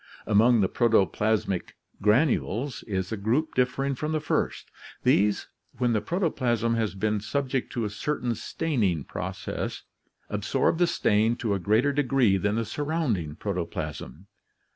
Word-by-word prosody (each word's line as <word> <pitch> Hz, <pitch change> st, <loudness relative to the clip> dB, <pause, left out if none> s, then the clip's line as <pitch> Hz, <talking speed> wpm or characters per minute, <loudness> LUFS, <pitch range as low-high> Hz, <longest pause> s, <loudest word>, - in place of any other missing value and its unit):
Among 110 Hz, +2 st, +4 dB
the 95 Hz, -, +3 dB
protoplasmic 105 Hz, -3 st, +1 dB, 0.3 s
granules 120 Hz, +2 st, +1 dB
is 95 Hz, -2 st, -2 dB
a 110 Hz, -, -2 dB
group 120 Hz, +11 st, 0 dB
differing 130 Hz, +2 st, +1 dB
from 150 Hz, +4 st, -3 dB
the 155 Hz, -, +1 dB
first. 150 Hz, -, -2 dB, 0.3 s
These, 105 Hz, +1 st, +3 dB, 0.3 s
when 120 Hz, -1 st, +1 dB
the 105 Hz, -, +1 dB
protoplasm 125 Hz, -, 0 dB
has 110 Hz, -4 st, -1 dB
been 105 Hz, +2 st, 0 dB
subject 135 Hz, +4 st, -2 dB
to 120 Hz, -3 st, -1 dB
a -, -, -2 dB
certain 125 Hz, +1 st, -2 dB
staining 110 Hz, -, -1 dB
process, -, -, -5 dB, 0.4 s
absorb 165 Hz, -, 0 dB
the 175 Hz, -, +4 dB
stain 110 Hz, -5 st, +2 dB
to 115 Hz, -4 st, -1 dB
a 100 Hz, -, 0 dB
greater 110 Hz, +10 st, +2 dB
degree 130 Hz, -7 st, +3 dB
than 105 Hz, +2 st, 0 dB
the 115 Hz, 0 st, 0 dB
surrounding 120 Hz, -, -2 dB
protoplasm. 85 Hz, -4 st, -5 dB
115 Hz, 140 wpm, -27 LUFS, 100-135 Hz, 0.4 s, Among